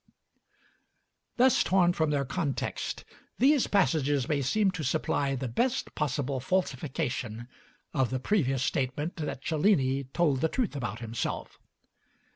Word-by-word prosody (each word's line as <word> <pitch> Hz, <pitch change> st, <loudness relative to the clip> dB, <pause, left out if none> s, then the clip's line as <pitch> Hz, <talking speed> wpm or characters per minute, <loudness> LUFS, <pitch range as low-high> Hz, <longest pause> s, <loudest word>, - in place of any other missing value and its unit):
Thus 255 Hz, 0 st, +5 dB
torn 180 Hz, -2 st, +3 dB
from 160 Hz, -3 st, +1 dB
their 140 Hz, -2 st, 0 dB
context, 145 Hz, 0 st, -3 dB, 0.3 s
these 275 Hz, +2 st, +4 dB
passages 145 Hz, -7 st, +2 dB
may 145 Hz, -2 st, +1 dB
seem 195 Hz, +9 st, +2 dB
to 180 Hz, -4 st, -5 dB
supply 140 Hz, +1 st, 0 dB
the 130 Hz, 0 st, -3 dB
best 245 Hz, -, -1 dB
possible 140 Hz, -2 st, -1 dB
falsification 130 Hz, -, -2 dB, 0.5 s
of 130 Hz, -4 st, +1 dB
the 130 Hz, -, -2 dB
previous 135 Hz, -6 st, +1 dB
statement 140 Hz, +7 st, -1 dB
that 150 Hz, -4 st, -4 dB
Cellini 140 Hz, -5 st, +2 dB
told 135 Hz, -1 st, +1 dB
the 160 Hz, -, +2 dB
truth 235 Hz, -, -1 dB
about 120 Hz, -4 st, -4 dB
himself. 115 Hz, 0 st, -4 dB
145 Hz, 125 wpm, -29 LUFS, 130-175 Hz, 0.5 s, Thus